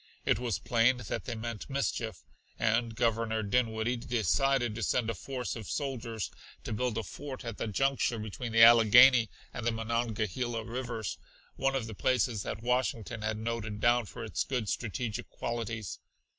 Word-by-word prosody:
It - - +3
was 120 -5 -1
plain 120 +2 +3
that 120 -5 -4
they 120 - -3
meant 115 +1 -5
mischief, 120 -6 -2 0.3
and 115 0 +1
Governor 115 -1 +1
Dinwiddie 115 +2 +1
decided 120 +1 +1
to 115 - -5
send 115 +2 +1
a - - -3
force 125 +6 -4
of 110 -5 -7
soldiers 120 -6 -3 0.3
to - - -4
build 120 0 -1
a 115 - -1
fort 135 +4 -7
at 115 -2 -5
the - - -2
juncture 135 +2 +1
between 110 +2 -5
the 115 0 +7
Allegheny 120 +1 +8 0.2
and 120 - -5
the 120 - +2
Monongahela 115 0 -2
rivers, 120 -2 -4 0.4
one 135 0 +1
of 130 -4 -1
the 110 - -7
places 115 -1 +1
that 110 - -5
Washington 120 -2 -1
had 110 0 -1
noted 110 -1 -3
down 120 0 +3
for - - -8
its - - -1
good 125 -5 -2
strategic 115 -1 -3
qualities. 115 -3 -4
115 Hz, 165 wpm, -31 LUFS, 110-125 Hz, 0.4 s, Allegheny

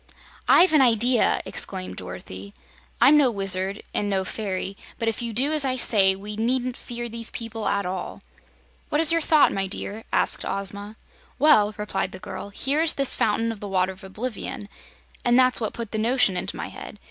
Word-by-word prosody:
"I've 360 -2 +6
an 305 - +6
idea!" 240 -1 +3
exclaimed 90 0 -5
Dorothy. 95 +2 -9 0.4
"I'm 300 - +6
no 280 -4 +4
wizard, 195 -1 -2
and 205 - -1
no 190 -1 -1
fairy, 195 -2 -4 0.2
but 230 - -3
if 225 +2 -1
you 235 -1 -4
do 260 +7 +1
as 305 -2 +3
I 260 -1 0
say, 195 -6 +4
we 205 +2 -7
needn't 245 +3 -1
fear 240 -2 -6
these 230 0 -6
people 225 -1 -6
at 200 -1 0
all." 180 0 -6 0.7
"What 295 - 0
is 325 -1 +7
your 330 0 +2
thought, 310 -1 +4
my 195 0 -2
dear?" 205 +3 -6
asked - - +2
Ozma. 200 +2 -2 0.4
"Well," 215 -7 +4
replied 195 -2 -3
the - - -7
girl, 200 - -8
"here 275 +9 -1
is 325 -1 +3
this 275 -2 +4
Fountain 225 +2 0
of 220 - -8
the 205 - -7
Water 185 -1 0
of 190 +2 -14
Oblivion, 210 0 -6 0.5
and 240 0 +3
that's 255 -1 +4
what 220 - -1
put 230 -3 -7
the 220 - -2
notion 230 -4 +2
into 180 - -3
my - - -5
head. - - -10
220 Hz, 195 wpm, -24 LUFS, 195-255 Hz, 0.7 s, is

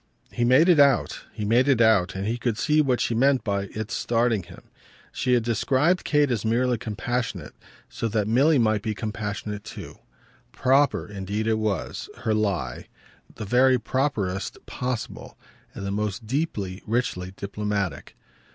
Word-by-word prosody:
He 120 - -1
made 130 +8 +5
it 175 -4 +5
out, 140 -1 +3
he 105 - -5
made 120 +5 +3
it 135 -4 +3
out, 110 -7 +4
and 95 +1 -3
he 115 +3 -2
could 120 -3 -1
see 150 +3 +3
what 130 -4 +1
she - - 0
meant 130 +3 +3
by 100 -1 -1
its 110 +3 -6
starting 115 -2 +1
him. 85 - -14 0.5
She 125 - 0
had 120 -2 +3
described 130 - +1
Kate 145 -2 +2
as 115 -4 -1
merely 120 +1 +1
compassionate, 115 -4 -3 0.3
so 115 - -3
that 105 -1 0
Milly 140 +7 +4
might 110 -4 +2
be 110 0 -3
compassionate 105 -1 -4
too. - - -9 0.5
"Proper" 135 +2 +2
indeed 100 +1 -4
it 110 -1 +1
was, 105 -5 -3
her 110 - 0
lie 95 -13 -2 0.5
the - - -6
very 125 +4 +4
properest 110 -7 -2
possible 125 -2 -5 0.4
and 100 - -6
the 100 - -2
most 105 +1 -3
deeply, 105 - -2
richly 105 -5 -1
diplomatic. 100 -2 -3
110 Hz, 160 wpm, -25 LUFS, 105-125 Hz, 0.5 s, made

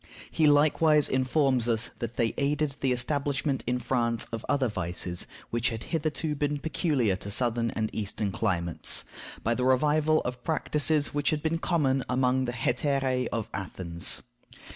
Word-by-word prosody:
He 160 -2 +3
likewise 150 +1 +4
informs 130 -2 +1
us 115 +1 +1
that 120 0 -4
they 115 -1 +1
aided 145 0 0
the 135 - +1
establishment 140 +2 -1
in 125 +1 +1
France 120 -2 -1
of 115 -1 -4
other 135 -3 +2
vices 90 -3 -3 0.2
which 120 +1 +1
had 115 -1 -5
hitherto 155 0 -1
been 145 0 -1
peculiar 140 - 0
to 100 - -7
Southern 115 +1 +1
and 110 -1 -2
Eastern 105 -1 -2
climates, 85 -5 0 0.4
by 115 - +1
the 125 - -2
revival 150 +4 +3
of 125 -1 -5
practices 150 -1 +1
which 145 0 +1
had 150 -1 -1
been 165 +1 0
common 135 -7 +1
among 130 +1 +2
the 120 - -2
hetairæ 130 +1 0
of 115 -2 -2
Athens. 90 -2 -1
130 Hz, 155 wpm, -28 LUFS, 115-145 Hz, 0.4 s, likewise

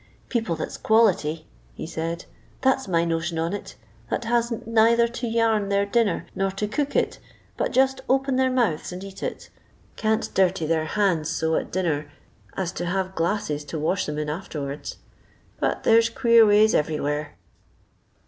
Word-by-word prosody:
" - - -33
People 225 -9 -1
that - - -4
's - - -7
quality," 195 -8 +2 0.3
he - - -6
said, 165 +1 -4 0.2
" - - -31
that 265 0 +3
's - - -10
my 170 -2 +2
notion 165 0 -1
on 165 +3 -1
it, 205 - -6 0.3
that - - -2
hasn't 235 0 0
neither 230 +1 +4
to 235 +1 -5
yam 225 -3 +1
their 200 0 +2
dinner, 210 -3 +1
nor 195 0 0
to 195 +2 -3
cook 280 +7 -2
it, - - 0 0.4
but - - -1
just 265 +1 +2
open 270 0 +2
their 260 0 +3
mouths 235 -14 0
and 180 +1 -7
eat 195 -1 -10
it, - - -5 0.5
can't 220 0 0
dirty 185 -3 +2
their 160 0 +1
hands 170 -5 +1
so 160 0 0
at - - -2
dinner 155 -5 -1 0.5
as 185 -3 -1
to 175 - -4
have 190 +1 -1
glasses 165 -5 -1
to 160 - -5
wash 160 +3 0
'em 150 - -4
in 150 0 -2
arterards. 150 -3 -5 0.6
But - - -1
there 225 0 +6
's 230 - 0
queer 230 -1 +5
ways 210 +1 +5
everywhere." 150 -1 -1
195 Hz, 180 wpm, -24 LUFS, 165-230 Hz, 0.6 s, there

